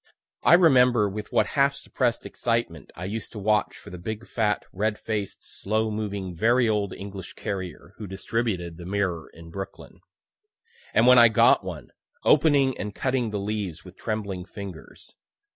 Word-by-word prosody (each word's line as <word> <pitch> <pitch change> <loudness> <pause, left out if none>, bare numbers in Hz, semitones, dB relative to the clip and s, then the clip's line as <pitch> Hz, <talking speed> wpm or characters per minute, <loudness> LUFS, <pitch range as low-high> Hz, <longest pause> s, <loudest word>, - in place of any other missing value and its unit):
I - - +7
remember 125 - +5
with 105 +1 -6
what - - +3
half 140 0 +2
suppress'd 125 -3 -1
excitement 115 - -2
I 90 - -6
used 110 +4 -4
to - - -8
watch 105 0 +1
for - - -12
the 90 - -8
big, 110 +5 -5
fat, 105 -4 0
red 105 +2 0
faced, 105 -3 -4
slow 110 +2 -1
moving, 100 -3 -3
very 120 +7 +3
old 105 -3 0
English 95 -2 -8
carrier 95 -4 -6
who 105 - -7
distributed 95 -3 -2
the 85 - -9
"Mirror" 95 -5 -1
in 85 0 -13
Brooklyn; 95 +2 -8 0.9
and - - +4
when 125 0 +8
I 120 - +9
got 110 - +5
one, - - -7 0.3
opening 140 -5 +4
and 105 -1 -5
cutting 130 -3 0
the 105 - -3
leaves 100 -4 -4
with 90 0 -12
trembling 100 -5 -3
fingers. 95 -4 -10
105 Hz, 160 wpm, -25 LUFS, 95-115 Hz, 0.9 s, I